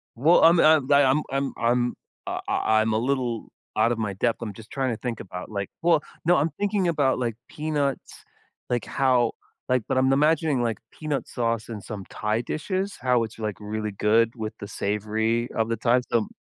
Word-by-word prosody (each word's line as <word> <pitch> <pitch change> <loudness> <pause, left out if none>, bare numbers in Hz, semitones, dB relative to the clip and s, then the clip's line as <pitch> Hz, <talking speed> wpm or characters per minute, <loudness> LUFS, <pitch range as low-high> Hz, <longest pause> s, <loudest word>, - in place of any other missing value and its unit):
Well, 150 +9 +5
um, 165 +1 +7
I 155 0 +7
I, 140 0 +7
um, 135 +3 +3
I'm 135 0 -1
I'm 120 +1 +1 0.3
I - - -2
I 110 0 +2
I'm 110 0 +1
a - - +2
little 125 -1 -1 0.3
out 110 +2 +3
of 120 - -1
my 105 -3 -2
depth, 115 +4 0
I'm 105 -3 -5
just 110 +2 -13
trying 135 -2 -1
to - - -5
think 120 -3 -3
about, 90 -1 -7
like 100 -2 -4
well, 165 -3 +3 0.2
no, 175 +2 +5
I'm 155 +3 +1
thinking 200 -2 +1
about, 145 -6 +2
like, 120 -3 -2
peanuts, 150 -3 -3 0.5
like, 120 -1 0
how 125 -3 +2 0.4
like, 125 -1 +3
but - - 0
I'm 130 +1 +4
imagining, 150 -1 +2
like, 115 -2 -1
peanut 150 -3 -3
sauce 115 -2 -2
in 110 -3 -6
some 100 -2 -7
Thai 105 +2 -1
dishes? 190 - -3
How 125 -2 +3
it's, 110 0 -8
like, 105 -2 -2
really 105 0 -3
good 110 +3 +2
with 110 -2 -4
the 100 - -6
savory 110 +4 -1
of 115 0 -1
the 115 - -1
Thai, 120 +3 +3
so 115 -3 +2
120 Hz, 200 wpm, -25 LUFS, 110-140 Hz, 0.5 s, um